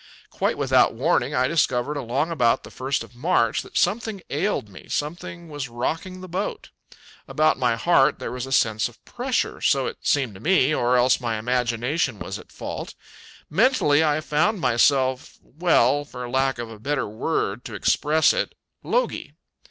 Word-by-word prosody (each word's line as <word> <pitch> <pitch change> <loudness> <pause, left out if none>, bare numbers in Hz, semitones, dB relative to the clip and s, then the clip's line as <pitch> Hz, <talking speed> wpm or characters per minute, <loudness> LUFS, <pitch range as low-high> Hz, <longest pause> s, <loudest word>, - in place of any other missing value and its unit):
Quite - - -1
without - - +3
warning, - - +1
I 125 +1 +2
discovered 140 -3 +1
along 140 +4 -1
about 125 -8 +2
the - - -11
first 135 +2 -2
of - - -15
March 120 -4 +1
that - - -7
something 220 -3 0
ailed 160 - -1
me; 95 -2 -14
something 170 +3 -4
was 145 -4 -6
rocking 165 +10 -4
the 185 - -8
boat. 185 +4 -4 0.6
About 155 -1 +2
my 120 -3 +2
heart 140 +1 +3
there - - -5
was 125 +1 -5
a - - -9
sense 110 -3 +2
of 120 - -22
pressure, 250 0 -2
so 135 -4 +2
it - - -5
seemed 135 -7 +1
to 95 - -12
me, 155 - +3
or 125 -2 +2
else 125 +1 +4
my 115 -2 -1
imagination 125 +3 -1
was - - -6
at - - -15
fault. - - -6 0.5
Mentally, 160 - +3
I 155 0 +1
found 175 +8 +1
myself 130 0 +2
well, 145 -4 +2
for 125 -3 -8
lack 135 +1 0
of 120 -1 -6
a 110 - -11
better 145 +4 -1
word 110 0 -2
to 110 - -7
express 150 +10 +3
it - - -2 0.3
logy. - - -1
135 Hz, 170 wpm, -23 LUFS, 120-165 Hz, 0.6 s, else